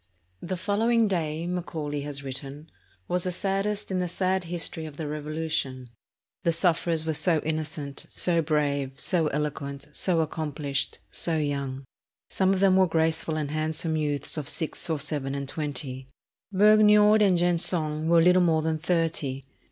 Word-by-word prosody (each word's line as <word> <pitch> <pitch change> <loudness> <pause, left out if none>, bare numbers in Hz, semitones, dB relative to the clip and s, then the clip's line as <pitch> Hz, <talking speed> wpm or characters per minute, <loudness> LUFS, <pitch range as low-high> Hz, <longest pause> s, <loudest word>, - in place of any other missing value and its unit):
"The 185 +1 -3
following 225 +4 +2
day," 165 -4 -1
Macaulay 160 -5 -3
has 140 -1 -6
written, 140 +3 -7 0.4
"was 180 0 -1
the 185 - -1
saddest 195 +2 -2
in 185 - 0
the 180 - 0
sad 185 +1 0
history 165 -1 -3
of 150 -2 -11
the 160 - -4
Revolution. 150 -4 -3 0.5
The 170 -3 +2
sufferers 165 -1 +1
were 160 - 0
so 165 +2 +3
innocent, 155 -2 -4
so 170 -2 +2
brave, 145 -3 0
so 170 -4 +2
eloquent, 140 -1 -3
so 170 +2 +1
accomplished, 150 -3 -3
so 165 -2 0
young. 140 -3 -2 0.5
Some 190 0 +2
of 195 -1 +1
them 190 -1 +5
were 190 -1 +5
graceful 160 -1 0
and 150 -2 -2
handsome 160 +1 -1
youths 145 -1 -2
of 145 - -6
six 165 +1 -3
or 160 - +1
seven 140 -2 -2
and 140 -1 -4
twenty. 135 -3 -4 0.4
Vergniaud 210 +1 +6
and 190 -4 +4
Gensonne 165 -3 +1
were 170 -1 +6
little 180 +1 +5
more 160 -3 +3
than 160 0 0
thirty. 155 -6 -1
160 Hz, 155 wpm, -27 LUFS, 145-180 Hz, 0.5 s, Vergniaud